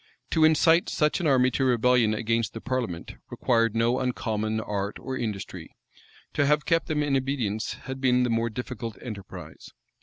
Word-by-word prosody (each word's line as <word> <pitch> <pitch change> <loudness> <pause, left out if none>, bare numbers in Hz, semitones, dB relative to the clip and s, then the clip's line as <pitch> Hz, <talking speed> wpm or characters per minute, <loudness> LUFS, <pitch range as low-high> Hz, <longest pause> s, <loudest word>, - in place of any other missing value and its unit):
To 160 - +3
incite 165 +4 +4
such 150 +3 +1
an 175 - 0
army 130 -2 +4
to 135 - 0
rebellion 125 -3 +3
against 115 0 -1
the - - -4
parliament, 120 -10 -4
required 115 -2 +1
no 115 +2 +2
uncommon 110 -4 -1
art 100 -2 -3
or 130 - -5
industry: 105 -6 -5 0.6
to 140 - +2
have 150 +1 +2
kept 165 -1 +1
them 150 -2 0
in 145 -2 +1
obedience 130 -6 -1
had 130 0 -6
been 125 -1 +3
the 125 - 0
more 115 +1 +1
difficult 115 -1 -6
enterprise. 100 -6 -9
125 Hz, 170 wpm, -26 LUFS, 110-135 Hz, 0.6 s, incite